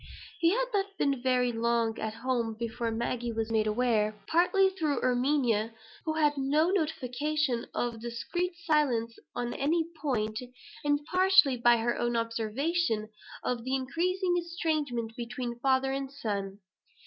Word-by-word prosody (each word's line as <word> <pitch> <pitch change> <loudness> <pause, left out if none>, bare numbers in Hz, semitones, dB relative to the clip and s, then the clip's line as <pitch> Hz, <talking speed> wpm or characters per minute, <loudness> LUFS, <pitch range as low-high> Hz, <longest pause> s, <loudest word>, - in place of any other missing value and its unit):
He 335 - +4
had - - +2
not 395 -1 -1
been 275 -3 +1
very 250 -1 +2
long 230 -1 0
at 220 0 -3
home 230 -2 -1
before 230 0 -2
Maggie 235 +1 -2
was 225 0 -2
made 215 -1 +2
aware, 215 -2 +1
partly 360 +3 +3
through 310 -8 -1
Erminia, 245 -4 +1 0.3
who 315 - 0
had 295 -2 +2
no 300 +6 +2
notion 300 -5 -1
of 235 -2 -2
discreet 345 +10 -3
silence 250 -8 +1 0.2
on 240 0 -2
any 320 +4 +1 0.2
point, 215 -7 -1 0.4
and 290 0 +1
partly 365 -4 +5
by 240 0 +5
her 235 +1 0
own 240 0 0
observation, 230 +2 0 0.3
of 245 -2 -1
the 260 +2 0
increasing 355 +7 0
estrangement 305 -9 -2
between 240 0 -5
father 265 +1 +2
and 270 0 -3
son. 200 -6 -4
250 Hz, 140 wpm, -29 LUFS, 230-310 Hz, 0.4 s, partly